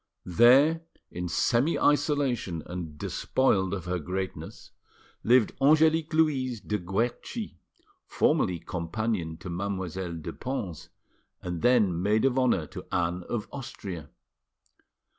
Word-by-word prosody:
There 130 - +5 0.3
in 90 0 -4
semi 125 - +2
isolation 135 - +1
and 85 -4 -6
despoiled 95 - +1
of 95 -4 -4
her 90 0 -1
greatness 95 +4 -5 0.5
lived 120 -2 +4
Angelique 155 +2 +4
Louise 135 -7 +1
de 105 0 -3
Guerchi, 115 - -3 0.5
formerly 90 - +2
companion 85 0 -3
to 90 - -8
Mademoiselle 95 -1 -3
de 80 0 -6
Pons 90 - -5 0.5
and 90 -2 -4
then 105 -9 +3
maid 105 +5 +2
of 135 -1 +2
honour 120 -11 +2
to - - -10
Anne 90 0 0
of 115 -2 -3
Austria. 95 - -7
100 Hz, 115 wpm, -28 LUFS, 90-130 Hz, 0.5 s, There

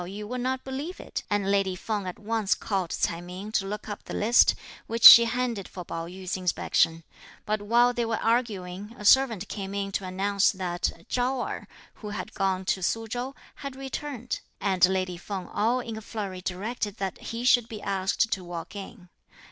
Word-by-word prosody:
Pao 175 - -6
yü 205 +3 -6
would 250 +2 -3
not 260 +1 -1
believe 280 +7 -5
it, - - -5
and 200 -1 +1
lady 195 -2 +2
Feng 205 +1 -3
at 180 - -5
once 220 -1 0
called 190 -4 -2
Ts'ai 170 0 -1
Ming 185 +4 -8
to 195 -3 0
look 210 +1 -5
up 205 - -7
the - - -6
list, 230 +4 +5 0.3
which 230 0 -3
she 235 - +13
handed 235 -4 -2
for 180 -2 -8
Pao 165 0 -5
yü's 185 +1 -5
inspection; 165 -2 +1 0.4
but 215 0 -1
while 240 +4 +4
they 240 - 0
were 225 -1 -1
arguing 210 -3 -1
a 210 - -8
servant 225 -5 +5
came 195 -1 -5
in 200 0 -2
to 195 - -2
announce 195 +2 +2
that 175 -2 -3
Chao 250 +1 0
Erh, - - -6 0.3
who 210 - -5
had 210 +1 -6
gone 190 -1 0
to 190 - 0
Su 225 +5 -1
Chow, 245 +4 -4 0.2
had 275 -2 -6
returned, 270 -2 -5 0.2
and 190 -3 0
lady 185 -2 -1
Feng 185 +1 -6
all 230 +5 +1
in 230 -2 -6
a 220 - -6
flurry 200 -4 -5
directed 205 +3 -3
that 195 -2 -3
he 230 +1 -5
should 245 -2 +4
be 215 - -6
asked 195 +3 0
to 190 - -1
walk 175 +2 -7
in. 190 -2 -9
205 Hz, 195 wpm, -27 LUFS, 185-235 Hz, 0.4 s, she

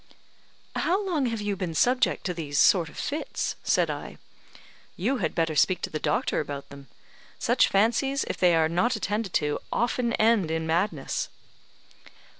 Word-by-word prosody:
"How 390 +3 0
long 315 -9 0
have 230 -2 -3
you 205 -1 -1
been 180 -4 -4
subject 250 +9 +2
to 180 - -1
these 150 -4 -4
sort 175 -5 +4
of - - -15
fits?" 300 +2 -3
said - - +2
I. - - -7 0.8
"You 245 +10 0
had 170 -9 -2
better 165 -2 0
speak 185 +5 +3
to - - -3
the 155 - -3
doctor 150 0 0
about 145 -2 -5
them. 140 -1 -12 0.5
Such - - +3
fancies, 235 +7 +2
if - - -4
they 175 -2 +4
are 160 -1 +3
not 180 +10 +1
attended 210 -1 -2
to, 150 0 0
often 240 0 0
end 215 -7 +3
in 160 0 -1
madness." 165 -2 -1
190 Hz, 165 wpm, -26 LUFS, 160-235 Hz, 0.8 s, sort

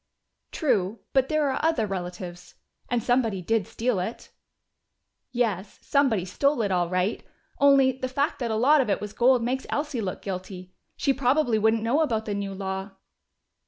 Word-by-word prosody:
"True. 215 - 0
But 265 -1 +3
there 310 -1 +2
are - - -3
other 320 -9 +2
relatives. 180 -2 -6 0.3
And 240 -2 0
somebody 240 -6 +1
did 225 +1 0
steal 235 -4 -1
it!" 220 +6 -5 1.0
"Yes, 215 -6 -1
somebody 255 -10 +2
stole 280 +6 +1
it, 200 - -1
all 175 -2 +1
right. 185 +3 0 0.4
Only, 275 -2 +6
the 255 0 -4
fact 280 +3 -1
that 240 -3 -2
a 220 - 0
lot 280 +7 +5
of 245 - -2
it 200 - +1
was 210 0 -6
gold 245 0 +3
makes 260 +3 -2
Elsie 290 -4 -2
look 185 -3 -4
guilty. 185 -1 -6 0.2
She 275 - +2
probably 260 -3 +2
wouldn't 220 +1 +2
know 255 +7 +2
about 225 -8 0
the 210 - -2
new 200 -1 -4
law." 190 +1 -4
225 Hz, 170 wpm, -26 LUFS, 195-265 Hz, 1.0 s, Only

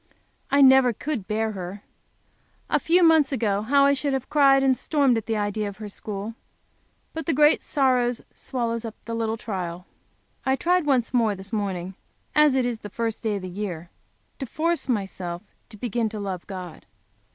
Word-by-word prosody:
I 280 +1 +4
never 265 -2 +7
could 245 -5 -4
bear 220 +1 0
her! 195 0 -7 0.9
A - - +3
few 350 +2 +3
months 320 -3 +5
ago, 210 -6 0
how 275 +5 +4
I 280 - +5
should 280 0 -1
have 265 -2 -3
cried 275 -2 +5
and 265 -1 +4
stormed 280 -3 +2
at 225 - -3
the 225 -1 0
idea 205 0 -1
of 200 - -11
her 215 -1 -7
school. 205 +1 -6 0.8
But 320 -2 -5
the 325 - +1
great 300 +2 +5
sorrow 255 -4 +2 0.2
swallows 230 -3 -3
up 225 -2 -6
the 230 - -5
little 225 -1 -1
trial. 180 -5 -5 0.6
I 265 0 +2
tried 355 +2 +1
once 255 -4 +2
more, 225 -4 +2
this 190 +3 -9
morning, 190 -3 -2 0.4
as 300 -3 +5
it 260 -2 +2
is 240 -2 -2
the 205 - -8
first 225 +1 -3
day 220 -3 -1
of 195 - -5
the - - -4
year, 180 -3 -5 0.5
to 270 - -4
force 330 +3 -1
myself 190 -5 -3 0.3
to 215 - -12
begin 230 0 -1
to 215 0 -6
love 190 -3 -5
God. 185 -4 -8
230 Hz, 185 wpm, -24 LUFS, 200-270 Hz, 0.9 s, never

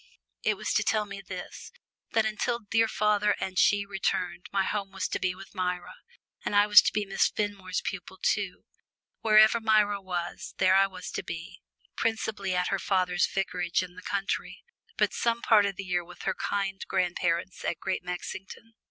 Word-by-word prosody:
It - - +1
was - - -2
to - - +3
tell 215 -1 +1
me 200 -1 -8
this 185 -1 -8 0.4
that 225 -1 +3
till 240 -1 +1
dear 225 0 +1
father 210 -1 +2
and 185 -1 -2
she 205 -1 +4
returned, 185 -3 -2
my 195 -1 +2
home 200 -1 -2
was 195 +1 -2
to - - -2
be 180 -1 0
with 195 - -12
Myra, 180 -2 -2 0.5
and - - -2
I 205 0 +6
was 210 0 +9
to - - 0
be 210 -1 -1
Miss 195 0 +2
Fenmore's 200 -3 -2
pupil 190 0 -5
too. 195 -1 -1 0.5
Wherever 215 +1 +6
Myra 210 -2 +3
was, 180 -2 -5
there 185 0 +4
I 195 +1 +5
was 185 -2 -8
to - - -3
be 165 0 -7 0.3
principally 215 -4 -1
at 180 0 +1
her 195 - 0
father's 185 -3 +1
vicarage 180 -2 -1
in 180 -1 -9
the 185 - -11
country, 195 +1 -3 0.3
but - - +2
some 235 0 0
part 210 -3 +5
of 195 - -3
the 195 - -5
year 180 -1 0
with 180 +1 -12
her 190 - 0
kind 195 -1 -2
grandparents 180 -1 -1
at 170 - -1
Great 190 -1 -2
Mexington. 190 +5 -7
195 Hz, 185 wpm, -28 LUFS, 185-205 Hz, 0.5 s, was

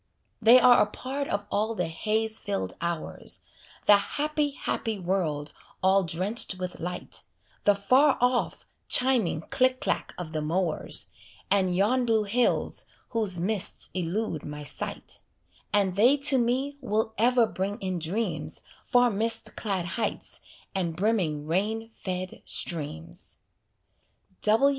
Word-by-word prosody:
They 235 +3 +8
are 245 -1 +7
a - - +3
part 270 +6 -3
of 205 0 -2
all 220 +2 0
the 180 - 0
haze 220 +6 -1
filled 95 - -3
hours, 170 -2 -3 0.4
The 205 - +8
happy, 295 +7 -1
happy 225 -5 -3
world 170 -6 -2 0.3
all 190 +1 +4
drenched 190 +6 +1
with 180 -1 -6
light, 180 +2 -4 0.4
The 205 - +5
far 260 +8 +4
off, 245 0 0 0.2
chiming 245 -11 +3
click 255 0 +2
clack - - -2
of 175 -3 -6
the 155 -1 -2
mowers, 165 +1 +1 0.4
And 190 -3 +2
yon 240 +6 +2
blue 220 -2 +3
hills 230 +4 +1 0.2
whose 210 -7 +1
mists 200 +2 0
elude 180 -1 -2
my 150 0 -7
sight; 140 - -3 0.5
And 195 -3 +2
they 245 +8 +5
to 275 -1 +5
me 260 +4 0
will 220 -2 -1
ever 240 +1 +4
bring 200 0 -3
in 185 -2 -3
dreams 195 +8 -3 0.2
Far 245 -2 +3
mist 225 +3 -1
clad 195 -5 -2
heights 215 +6 -3 0.3
and 175 -5 -2
brimming 175 -7 0
rain 215 +7 -1
fed 185 -2 -5
streams. 145 - -5
205 Hz, 130 wpm, -27 LUFS, 180-235 Hz, 0.5 s, They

